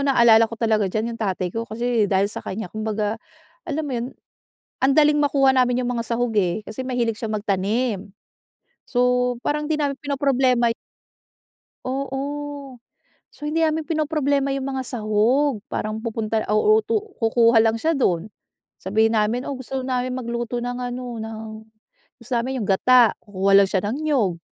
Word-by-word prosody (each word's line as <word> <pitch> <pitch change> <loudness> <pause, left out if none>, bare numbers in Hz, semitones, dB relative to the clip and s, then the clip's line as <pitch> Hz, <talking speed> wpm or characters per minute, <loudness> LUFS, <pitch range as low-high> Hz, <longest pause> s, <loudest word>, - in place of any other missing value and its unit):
naalala 235 -4 +5
ko 230 - -8
talaga 220 -3 +1
diyan 220 +4 -2
yung 230 - -9
tatay 185 -4 -2
ko, 230 0 -4
kasi 230 -1 0
dahil 200 +2 +1
sa - - -5
kanya 190 -2 -6
kumbaga, 215 0 -2 0.5
alam 310 0 -2
mo 285 - -4
yun, 240 -1 -2 0.7
ang 270 +1 +3
daling 300 -1 +5
makuha 275 -2 +3
namin 250 -1 +2
yung 245 - -1
mga 230 -1 -2
sahog 235 0 0
eh, 185 0 +1
kasi 215 +3 -7
mahilig 240 -3 -1
siyang 220 -3 -3
magtanim. 205 +1 -1 0.8
So 250 0 +2
parang 300 0 0
di 310 - +2
namin 285 -2 0
pinoproblema 265 -4 +2
yu - - -1 1.1
Oo. 275 +1 -4 0.5
So 295 - -9
hindi 320 +2 0
namin 315 -1 0
pinoproblema 290 -3 0
yung 270 -1 -3
mga 265 - -2
sahog, 235 +4 +1
parang 215 +1 -3
pupunta 225 -1 -2
o 425 - +4
uutu 445 0 0 0.2
kukuha 230 0 +4
lang 225 0 +1
siya 325 +7 +1
dun. 195 - 0 0.5
Sabihin 220 +4 +1
namin, 220 +4 0
"Oh, 280 - -3
gusto 260 +1 -4
namin 255 0 -2
magluto 240 -1 -3
ng 245 +1 -4
ano, 245 -1 -5
ng 220 0 -6 0.8
gusto 235 - -13
namin 255 +2 -2
yung 205 - -3
gata." 240 +4 +5
Kukuha 195 -1 0
lang 200 -1 +5
siya 190 -2 +1
ng 245 - -2
niyog. 225 - +1
240 Hz, 165 wpm, -22 LUFS, 220-270 Hz, 1.1 s, naalala